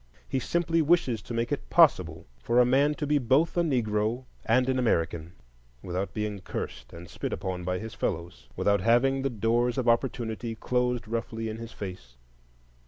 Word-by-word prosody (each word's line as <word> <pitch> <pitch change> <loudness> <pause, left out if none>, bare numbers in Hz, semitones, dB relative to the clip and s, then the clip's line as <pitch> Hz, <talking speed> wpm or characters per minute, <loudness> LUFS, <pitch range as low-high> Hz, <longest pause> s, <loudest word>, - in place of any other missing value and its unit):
He 130 - -1
simply 165 +4 +1
wishes 145 - +2
to 120 - -8
make 115 +2 -1
it 145 - -3
possible 90 - +4
for 120 - +2
a 125 - +6
man 140 +4 +3
to 150 - -3
be 145 0 +2
both 135 +6 +2
a 175 - +3
Negro 120 -4 0 0.2
and 125 +3 +3
an 130 -1 +1
American, 85 -7 0 0.5
without 95 +2 -3
being 105 -2 -2
cursed 60 -9 -6
and 85 +1 -10
spit 80 - -5
upon 90 -1 -3
by 90 +1 -1
his 110 +3 -7
fellows, 85 -7 -4
without 100 -1 +2
having 120 +5 +3
the 135 - 0
doors 120 +2 +1
of 125 -2 -1
Opportunity 115 -1 0
closed 125 0 -1
roughly 115 0 -3
in 110 - -5
his 115 0 -8
face. 90 -12 -8
115 Hz, 175 wpm, -28 LUFS, 95-130 Hz, 0.5 s, a